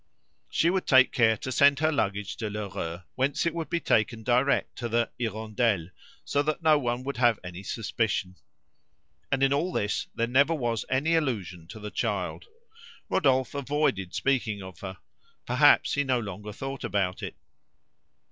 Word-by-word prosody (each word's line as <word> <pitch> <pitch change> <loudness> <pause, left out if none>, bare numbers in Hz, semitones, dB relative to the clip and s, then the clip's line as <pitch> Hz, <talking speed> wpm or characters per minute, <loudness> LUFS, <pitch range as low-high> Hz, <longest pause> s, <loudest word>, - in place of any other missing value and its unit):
She 170 - +2
would 190 0 -1
take 130 -2 +6
care 110 -2 +3
to 130 - -5
send 140 +2 +5
her 155 +2 +2
luggage 100 -8 -1
to 110 -2 -3
Lheureux 95 -4 -5
whence 135 +5 0
it 170 - +1
would 165 -3 -4
be 170 - 0
taken 110 -5 +1
direct 125 +4 +2
to 120 -2 -3
the 115 +1 +1
"Hirondelle," 110 -5 -1 0.4
so 145 - +1
that 155 +3 -2
no 155 -2 +5
one 120 -1 -2
would 140 +1 -4
have 120 -3 +3
any 90 0 -7
suspicion. 100 -3 -2 0.9
And 135 +1 +2
in 135 0 +4
all 165 +6 0
this 105 - -1
there 115 - +1
never 140 +7 +3
was 120 -6 -2
any 140 +6 +1
allusion 100 - -1
to 110 +5 -10
the 105 0 -7
child. - - -2 0.6
Rodolphe 130 -7 +2
avoided 140 -10 -1
speaking 115 -7 0
of 95 -1 -11
her; 95 -1 -7 0.5
perhaps - - +4
he 145 - +2
no 130 -3 +1
longer 105 -1 -6
thought 135 +4 -6
about 95 -2 -1
it. - - -6
120 Hz, 165 wpm, -27 LUFS, 105-140 Hz, 0.9 s, take